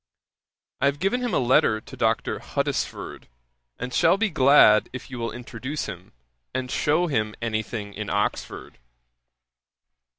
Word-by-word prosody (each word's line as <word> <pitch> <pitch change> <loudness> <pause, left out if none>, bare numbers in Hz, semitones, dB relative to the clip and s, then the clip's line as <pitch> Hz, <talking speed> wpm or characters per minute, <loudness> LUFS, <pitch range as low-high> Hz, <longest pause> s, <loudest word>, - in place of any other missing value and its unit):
I 140 - +4
have 140 +1 0
given 195 +10 0
him 245 -2 -1
a - - +1
letter 120 -3 +3
to - - -12
Dr. - - 0
Huddesford, - - -3 0.5
and 125 +1 -5
shall 165 +10 +4
be 220 -1 0
glad 130 -7 +6
if 130 +1 -8
you 125 - -6
will 115 0 -2
introduce 125 +4 -5
him, 90 +1 -9 0.4
and 130 -1 -2
shew 155 +4 +2
him 110 -9 -1
any 110 -2 -1
thing 105 -2 -6
in 105 0 -5
Oxford. 100 0 -3
125 Hz, 145 wpm, -24 LUFS, 110-145 Hz, 0.5 s, glad